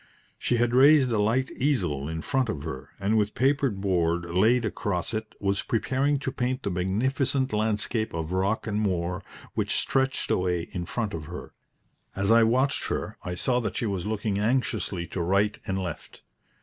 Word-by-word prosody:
She 120 - +1
had 120 0 +1
raised 135 0 +6
a 110 - +1
light 115 +5 +1
easel 90 - 0
in 80 0 -4
front 130 -4 0
of 70 -9 -3
her, 65 +2 -6
and 105 +3 +2
with 105 0 -1
papered 135 -5 +1
board 85 -3 +1
laid 110 +8 +3
across 100 -1 -2
it, 110 0 -4
was 100 0 0
preparing 130 +6 +1
to 135 - -2
paint 130 -1 -2
the 100 - -1
magnificent 130 +9 0
landscape 110 +1 0
of 80 0 -4
rock 95 +4 0
and 105 -1 -1
moor 90 -2 -1 0.3
which - - 0
stretched 135 0 0
away 90 -2 +1
in 85 -1 -4
front 115 -4 -2
of 80 -2 -5
her. 90 +3 -8 0.6
As 100 +2 +1
I 115 0 +7
watched 130 +5 +2
her - - -3
I 90 - -4
saw 125 +6 +1
that 110 -5 -3
she - - -1
was 100 -3 -2
looking 105 -2 -1
anxiously 110 -5 0
to 90 - -4
right 100 +4 +1
and 95 - -1
left. 90 -5 -6
105 Hz, 180 wpm, -27 LUFS, 90-125 Hz, 0.6 s, I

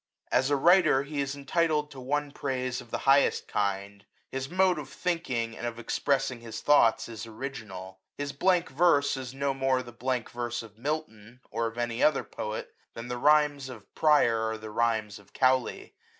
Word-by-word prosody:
As 130 +2 +3
a 145 - +3
writer, 170 -2 +5
he 145 0 -3
is 140 0 -3
entitled 150 +1 0
to 135 - -10
one 145 +3 -2
praise 130 -3 -3
of 120 - -15
the - - -2
highest 140 +1 +4
kind: 100 0 -2 0.3
his 135 0 -4
mode 185 -1 +3
of 145 -2 -8
thinking, 130 -12 -2
and 120 - -4
of 115 -1 -5
expressing 130 +1 0
his 115 -1 -7
thoughts, 115 -6 +4
is 115 -1 -7
original. 110 -7 -7 0.2
His 145 0 -4
blank 180 +3 +2
verse 145 -1 +3
is 130 -1 -7
no 140 0 0
more 135 -1 +1
the 120 - -11
blank 125 0 -2
verse 120 -1 -3
of 110 -2 -14
Milton, 120 -4 -5
or 115 -1 -1
(Jf 115 - -18
any 120 0 -2
other 150 -2 +3
poet, 110 0 -6 0.2
than 115 +1 -7
the 125 0 -3
rhymes 145 -1 +3
of 115 -5 -12
Prior 145 -8 +4
are 110 - -3
the 110 0 -9
rhymes 110 -2 0
of 100 - -21
Cowley. 130 -1 +1
130 Hz, 185 wpm, -28 LUFS, 115-145 Hz, 0.3 s, writer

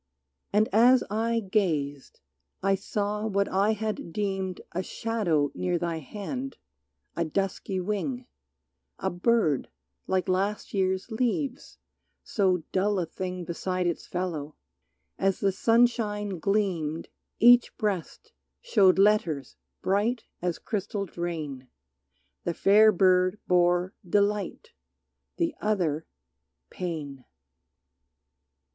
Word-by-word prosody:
And 210 +2 +3
as 245 +4 +6
I 230 +2 +1
gazed 155 -9 -1 0.4
I 195 0 +3
saw 205 +2 -2
what 200 -1 +1
I 200 +3 +2
had 215 -5 -4
deemed 190 -1 -2
A 180 - -2
shadow 185 -9 0
near 180 -1 -1
thy 170 -1 -2
hand, 240 - -6 0.6
a - - 0
dusky 190 +3 -2
wing, 210 +7 -2 0.7
A - - -2
bird 175 - +1 0.4
like 185 -1 0
last 195 +3 -1
year's 190 +2 0
leaves, 250 +4 -2 0.5
so 185 -5 +1
dull 200 +2 +1
a 180 - 0
thing 180 +1 -5
Beside 180 +1 -2
its 170 -1 -2
fellow; 165 -5 -3 0.6
as 195 -1 +1
the 195 - +2
sunshine 210 -3 +1
gleamed 170 -5 0 0.3
Each 240 +1 +7
breast 210 - -3 0.3
showed 200 - +4
letters 190 - +2 0.3
bright 220 +5 +1 0.2
as 175 -1 -1
crystalled 200 -2 -4
rain, 155 -7 -4 0.8
The 170 - -2
fair 215 +2 +6
bird 185 0 +3
bore 180 +1 +3 0.2
"Delight," 205 +1 0 0.7
the 335 -2 0
other 175 -8 0 0.6
"Pain." 150 -7 -5
195 Hz, 105 wpm, -27 LUFS, 175-215 Hz, 0.8 s, Each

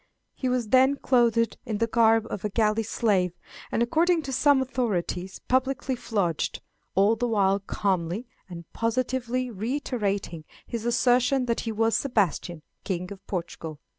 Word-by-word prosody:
He 260 - -2
was 250 -3 -1
then 265 +3 +5
clothed 235 -4 +2
in 220 -4 -3
the 230 - +2
garb 225 -1 +3
of 200 - -4
a 210 - -1
galley 215 +1 +1
slave, 200 -5 +1 0.4
and, 235 - +2
according 330 +6 +2
to 270 - -5
some 285 +2 +4
authorities, 200 -8 -2
publicly 260 0 0
flogged, 200 -9 -1 0.4
all 200 +4 +4
the 245 +2 -1
while 200 -3 +2
calmly 195 +1 -2 0.2
and 170 -1 -8
positively 250 +1 -1
reiterating 205 - -2 0.2
his 230 -1 -5
assertion 250 +2 +3
that 235 -1 0
he 225 - -3
was 225 +1 +1
Sebastian, 185 - 0 0.2
King 180 -1 -3
of 195 -1 -10
Portugal. 165 -4 -5
225 Hz, 145 wpm, -26 LUFS, 195-250 Hz, 0.4 s, then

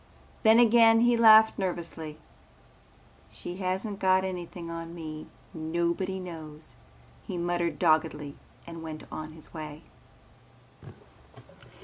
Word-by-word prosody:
Then 220 0 +6
again 230 -1 +6
he 240 0 +4
laughed 220 -2 +7
nervously. 165 -4 -4 1.1
"She 175 +1 -8
hasn't 190 +2 -3
got 190 0 +3
anything 175 -2 -6
on 165 0 -7
me. 155 -2 -7 0.3
Nobody 170 +4 -2
knows," 160 -4 -9 0.5
he 185 - -4
muttered 170 -2 -1
doggedly 155 -3 +1 0.3
and 165 -1 -9
went 155 -1 -7
on 155 0 -7
his 155 -1 -13
way. 155 -1 -8
170 Hz, 105 wpm, -28 LUFS, 160-190 Hz, 1.1 s, laughed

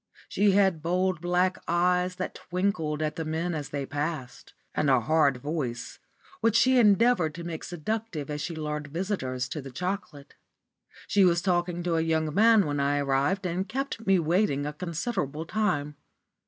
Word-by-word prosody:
She 205 -1 +2
had 190 -5 +3
bold, 180 +1 0
black 180 +1 +1
eyes, 180 +1 +2
that - - -4
twinkled 175 -5 -2
at 155 0 -2
the 165 - -2
men 160 +3 -2
as 150 -3 -4
they 140 -1 -3
passed, 145 -2 -5 0.2
and 150 - +1
a 130 -2 +5
hard 140 +1 +2
voice, 130 -4 -4 0.4
which 230 -1 +2
she 255 +2 +5
endeavoured 210 -6 +4
to 170 - -7
make 165 -2 -5
seductive 180 -2 -4
as 150 0 -3
she 170 - -4
lured 150 -1 -4
visitors 140 -7 -3
to 150 - -4
the 135 - -9
chocolate. 165 -1 -5 0.7
She 200 - +3
was 175 -2 +4
talking 175 -2 0
to 170 -2 0
a - - +2
young 160 -1 0
man 220 0 +5
when 145 -1 -2
I 140 +1 +1
arrived, 140 +8 0
and 180 +2 -2
kept 260 -2 -4
me 195 -1 +5
waiting 165 -3 +1
a 150 - -3
considerable 160 - -3
time. 160 -7 -1
170 Hz, 170 wpm, -27 LUFS, 150-190 Hz, 0.7 s, a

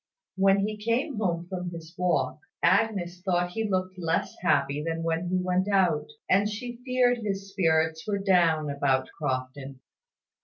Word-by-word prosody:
When 195 +1 +3
he 215 0 -5
came 240 +4 0
home 175 -4 -1
from 180 -1 -4
his 165 -1 -9
walk, 170 -7 0 0.2
Agnes 185 -2 +2
thought 175 -1 0
he 220 +2 -2
looked 185 -1 -2
less 165 -1 -1
happy 140 0 +1
than 165 0 -2
when 165 +1 -1
he 185 - +1
went 185 +1 0
out; 185 -6 +2 0.2
and 200 +3 +3
she 240 +3 -6
feared 250 -1 +2
his 195 -2 -4
spirits 160 -3 +1
were 205 -1 0
down 170 -6 +2
about 135 -2 +1
Crofton. 135 -1 -4
180 Hz, 155 wpm, -27 LUFS, 160-200 Hz, 0.2 s, When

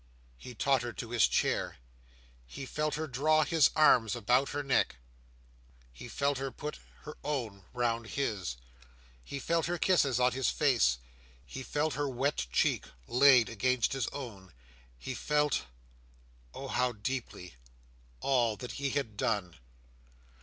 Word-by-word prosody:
He 125 - -10
tottered 120 -3 0
to 115 - -6
his 120 -3 +4
chair. - - 0 0.7
He 135 - -7
felt 150 +3 -2
her 160 +1 -2
draw 155 +3 +2
his 160 -2 +4
arms 125 -8 +5
about 125 +4 +2
her 145 0 -3
neck; 135 -2 +1 1.0
he - - -10
felt 140 +2 0
her 135 0 -2
put 150 +3 -7 0.2
her 150 - -9
own 115 -10 -3
round 115 -2 -1
his; 100 - -2 0.7
he 140 - -6
felt 165 +4 0
her 175 0 -1
kisses 145 -8 +2
on 125 0 +4
his 130 0 0
face; 120 - +3 0.5
he 130 - -7
felt 150 +3 -1
her 145 +1 -1
wet 130 - -1
cheek - - +1 0.2
laid 125 -2 +6
against 125 +2 +1
his 135 -3 -1
own; 105 -10 -8 0.4
he 130 - -5
felt—oh, - - -4
how 125 -1 +1
deeply!—all 80 - -4
that 125 +4 -7
he 140 0 -2
had 135 -6 -2
done. 100 -5 -1
125 Hz, 135 wpm, -31 LUFS, 100-140 Hz, 1.0 s, laid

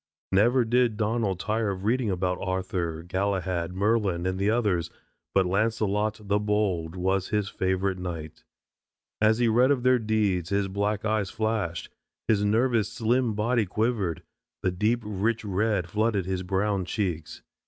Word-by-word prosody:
Never 120 +6 +4
did 120 -1 +2
Donald 105 -4 0
tire 110 0 0
of 95 -1 -4
reading 115 +1 +1
about 90 -1 -1
Arthur, 90 -3 -2
Galahad, 95 -2 -1
Merlin 100 -3 +1
and 95 0 -1
the 100 +2 +2
others, 105 -7 +1 0.5
but 95 -1 +4
Launcelot, 110 +2 0
the 100 +1 +2
Bold, 100 -6 0
was 95 +1 0
his 105 -2 0
favorite 95 0 -1
knight. 85 -4 -6 0.8
As 110 0 +4
he 120 -1 +2
read 120 +4 +4
of 135 -4 +1
their 125 0 +4
deeds 105 -6 0
his 100 -1 +1
black 100 +2 -1
eyes 105 -3 0
flashed, 110 -6 -2 0.4
his 105 -2 +3
nervous 115 +1 +2
slim 120 0 +1
body 110 0 +1
quivered, 105 -4 -1 0.4
the 90 - +2
deep 110 +6 +1
rich 105 +2 -1
red 100 -2 0
flooded 105 0 0
his 95 0 -2
brown 95 +1 0
cheeks. 90 -4 -3
105 Hz, 150 wpm, -26 LUFS, 95-110 Hz, 0.8 s, Never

